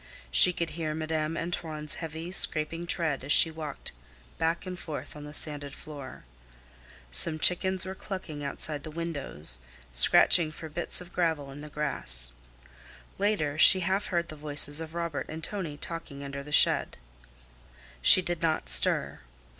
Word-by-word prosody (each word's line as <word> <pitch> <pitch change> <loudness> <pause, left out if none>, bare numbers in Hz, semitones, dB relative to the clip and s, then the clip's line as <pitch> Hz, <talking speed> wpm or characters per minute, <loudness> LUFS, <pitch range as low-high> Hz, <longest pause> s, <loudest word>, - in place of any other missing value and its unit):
She 180 - +8
could 170 -1 -4
hear 155 -1 -4
Madame 155 0 -3
Antoine's 160 -3 -4
heavy, 165 +2 -7
scraping 165 -1 0
tread 160 -6 -1
as 140 - -4
she 165 - +7
walked 155 -3 -6 0.5
back 165 +3 -1
and 180 -1 -7
forth 155 -2 -8
on 150 0 -10
the 150 - -10
sanded 145 -2 -3
floor. 145 -4 -11 0.9
Some 155 - +4
chickens 185 +4 +1
were 190 - -6
clucking 185 -7 -8
outside 145 +1 -4
the 155 - -9
windows, 140 - 0 0.3
scratching 155 - +5
for 160 +1 -10
bits 170 +3 0
of 175 -1 -13
gravel 160 -6 -2
in 140 +2 -10
the 150 - -10
grass. 65 - -4 0.9
Later 175 -8 -1
she 185 +3 +8
half 190 +4 -1
heard 170 -2 -2
the 155 - -8
voices 145 0 +3
of 160 0 -9
Robert 170 -3 -4
and 160 +1 -8
Tonie 170 -8 -4
talking 150 -4 -7
under 140 0 -7
the 150 +1 -12
shed. - - +3 1.0
She 185 - +8
did 175 -1 -4
not 160 -1 -1
stir. - - +1
155 Hz, 155 wpm, -27 LUFS, 145-170 Hz, 1.0 s, She